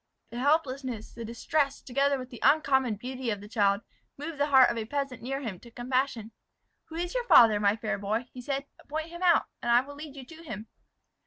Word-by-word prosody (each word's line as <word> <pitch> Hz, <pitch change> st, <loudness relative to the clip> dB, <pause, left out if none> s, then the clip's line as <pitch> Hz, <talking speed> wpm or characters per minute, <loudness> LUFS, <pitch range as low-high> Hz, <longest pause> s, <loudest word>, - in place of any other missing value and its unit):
The 240 Hz, -, -5 dB
helplessness, 265 Hz, -5 st, 0 dB
the 235 Hz, -, -7 dB
distress, 275 Hz, +5 st, -1 dB
together 275 Hz, +2 st, +1 dB
with 255 Hz, 0 st, -8 dB
the 240 Hz, -, -9 dB
uncommon 265 Hz, -6 st, +3 dB
beauty 255 Hz, +3 st, -5 dB
of 205 Hz, -2 st, -1 dB
the 205 Hz, -, -10 dB
child, 200 Hz, -2 st, +2 dB, 0.4 s
moved 295 Hz, +1 st, -6 dB
the 290 Hz, -, +2 dB
heart 265 Hz, -4 st, +6 dB
of 235 Hz, -, -4 dB
a 220 Hz, -, -3 dB
peasant 275 Hz, -1 st, -3 dB
near 270 Hz, +3 st, -3 dB
him, 210 Hz, -9 st, -5 dB
to 235 Hz, -, -14 dB
compassion. 245 Hz, -2 st, -2 dB, 0.5 s
"Who 320 Hz, -, -11 dB
is 345 Hz, +1 st, -3 dB
your -, -, -2 dB
father, 220 Hz, -, +7 dB
my 205 Hz, 0 st, +3 dB
fair 215 Hz, -2 st, -3 dB
boy?" 215 Hz, +4 st, -1 dB, 0.2 s
said 275 Hz, +2 st, -2 dB
he. 285 Hz, -, -24 dB
"Point 315 Hz, +2 st, -3 dB
him 345 Hz, +1 st, -9 dB
out, 355 Hz, -2 st, +4 dB, 0.2 s
and 240 Hz, -, 0 dB
I 240 Hz, +1 st, +6 dB
will 285 Hz, +2 st, -10 dB
lead 290 Hz, 0 st, -9 dB
you 270 Hz, -2 st, -9 dB
to 325 Hz, +4 st, -13 dB
him." 215 Hz, -6 st, -7 dB
260 Hz, 220 wpm, -28 LUFS, 230-285 Hz, 0.5 s, father